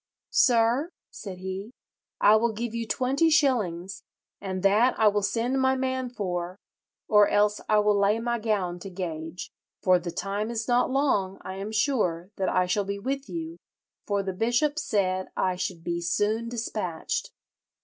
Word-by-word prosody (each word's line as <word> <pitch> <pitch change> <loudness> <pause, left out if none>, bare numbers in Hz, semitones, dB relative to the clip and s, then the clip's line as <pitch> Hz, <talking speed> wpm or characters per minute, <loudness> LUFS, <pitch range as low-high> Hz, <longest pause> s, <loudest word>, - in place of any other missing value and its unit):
'Sir,' 240 +5 +3 0.2
said 190 -3 -8
he, 190 +5 -6 0.5
'I 210 +1 +7
will 230 +1 +1
give 230 +1 -4
you 230 -1 -3
twenty 270 +8 +2
shillings, 200 - +1 0.4
and 190 -1 -4
that 215 +6 +3
I 220 - +5
will 205 0 +3
send 240 +6 0
my 265 0 +3
man 260 -1 -2
for, 180 -5 -4 0.5
or 210 -1 +6
else 210 0 +2
I 215 - +4
will 210 -1 +3
lay 200 +2 +3
my 235 +1 -1
gown 195 -5 -1
to 195 - -8
gage. 170 -2 -6 0.3
For 185 -1 +5
the 175 0 -5
time 200 +5 -3
is 230 -1 -3
not 245 0 +3
long, 230 -9 +1
I 190 0 -6
am 200 +2 -5
sure, 210 - 0
that 190 - 0
I 185 - +2
shall 195 +3 0
be 200 +1 -3
with 270 +6 -4
you, 330 0 -5 0.5
for 200 -1 0
the 190 -1 -3
bishop 240 +9 +1
said 185 -7 0
I 185 -1 +1
should 180 -2 -4
be 170 0 -2
soon 215 +6 0
despatched.' 215 -8 -3
210 Hz, 170 wpm, -26 LUFS, 185-240 Hz, 0.5 s, I